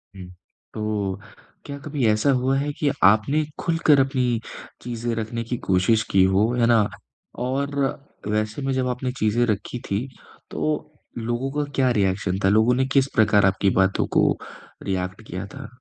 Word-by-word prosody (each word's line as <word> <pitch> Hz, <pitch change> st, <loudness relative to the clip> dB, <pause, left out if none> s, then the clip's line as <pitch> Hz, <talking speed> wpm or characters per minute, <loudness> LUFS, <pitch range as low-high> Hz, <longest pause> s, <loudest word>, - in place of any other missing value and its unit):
हुँ, 95 Hz, -2 st, -9 dB, 0.5 s
तो 105 Hz, -3 st, -2 dB, 0.5 s
क्या 140 Hz, -1 st, -6 dB
कभी 145 Hz, -4 st, -1 dB
ऐसा 110 Hz, +5 st, +2 dB
हुआ 130 Hz, +1 st, +1 dB
है 145 Hz, +2 st, -1 dB
कि 150 Hz, -, +2 dB
आपने 110 Hz, +10 st, +4 dB, 0.2 s
खुलकर 165 Hz, -4 st, +3 dB
अपनी 130 Hz, -3 st, +1 dB, 0.4 s
चीज़ें 120 Hz, -1 st, -3 dB
रखने 115 Hz, +1 st, -3 dB
की 120 Hz, +2 st, -3 dB
कोशिश 95 Hz, +4 st, +3 dB
की 95 Hz, -1 st, +5 dB
हो, 95 Hz, +4 st, +3 dB
है 120 Hz, -1 st, +2 dB
ना? 115 Hz, -3 st, +4 dB, 0.6 s
और 140 Hz, +2 st, -2 dB, 0.5 s
वैसे 110 Hz, +4 st, -1 dB
में 135 Hz, 0 st, -1 dB
जब 130 Hz, -1 st, 0 dB
आपने 125 Hz, +1 st, -2 dB
चीज़ें 110 Hz, +3 st, +2 dB
रखी 110 Hz, +2 st, -2 dB
थीं, 105 Hz, +7 st, -1 dB, 0.4 s
तो 155 Hz, 0 st, -2 dB, 0.3 s
लोगों 120 Hz, +3 st, -2 dB
का 145 Hz, -, -9 dB
क्या 130 Hz, -2 st, +3 dB
रिएक्शन 95 Hz, -3 st, 0 dB
था, 95 Hz, -, +4 dB
लोगों 110 Hz, +4 st, +4 dB
ने 130 Hz, +1 st, +1 dB
किस 135 Hz, -1 st, +4 dB
प्रकार 105 Hz, -3 st, +4 dB
आपकी 95 Hz, +1 st, +2 dB
बातों 95 Hz, 0 st, +2 dB
को -, -, +4 dB, 0.5 s
रिएक्ट 95 Hz, +1 st, -3 dB
किया 90 Hz, +3 st, -5 dB
था? -, -, -9 dB
115 Hz, 165 wpm, -23 LUFS, 100-130 Hz, 0.6 s, की